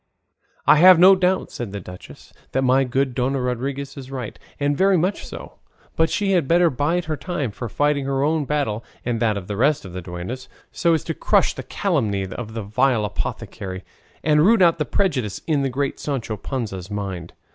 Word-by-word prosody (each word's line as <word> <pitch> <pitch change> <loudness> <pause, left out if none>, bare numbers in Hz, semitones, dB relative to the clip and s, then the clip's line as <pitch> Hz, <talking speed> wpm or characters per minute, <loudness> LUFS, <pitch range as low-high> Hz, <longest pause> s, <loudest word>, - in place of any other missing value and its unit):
"I - - +7
have 180 +3 +8
no 185 +3 +8
doubt," 185 0 0
said 120 -5 -5
the 100 - -5
duchess, 90 0 -12 0.2
"that 130 - +1
my 130 +1 +4
good 130 +1 0
Dona 130 +2 0
Rodriguez 135 +3 -3
is 135 -1 -8
right, 130 -5 -6 0.2
and 145 0 +1
very 190 +3 +4
much 185 +5 0
so; - - -10 0.4
but 160 0 +2
she 205 -3 0
had 175 -7 +2
better 170 +1 +4
bide 155 +7 0
her 155 -1 -2
time 145 - -3
for 115 +3 -6
fighting 145 +4 +1
her 135 0 0
own 155 0 +1
battle 135 -7 -1 0.2
and 120 -2 -1
that 110 -3 +1
of 95 - -6
the 105 - -3
rest 140 +3 +2
of 90 - -9
the 90 - -5
duennas, 90 +9 -7 0.2
so 170 -1 +2
as 160 - -2
to - - -3
crush - - +2
the - - -6
calumny 115 - -1
of 110 +4 -7
that 115 - -2
vile 115 +2 +1
apothecary, 95 -2 -5 0.4
and 150 -1 +4
root 215 +1 +5
out 170 -1 +4
the 150 - +1
prejudice 130 - -1
in 150 -4 +1
the 135 - 0
great 135 +2 -2
Sancho 130 -6 -3
Panza's 100 -5 -5
mind." 95 -5 -5
135 Hz, 200 wpm, -22 LUFS, 110-160 Hz, 0.4 s, have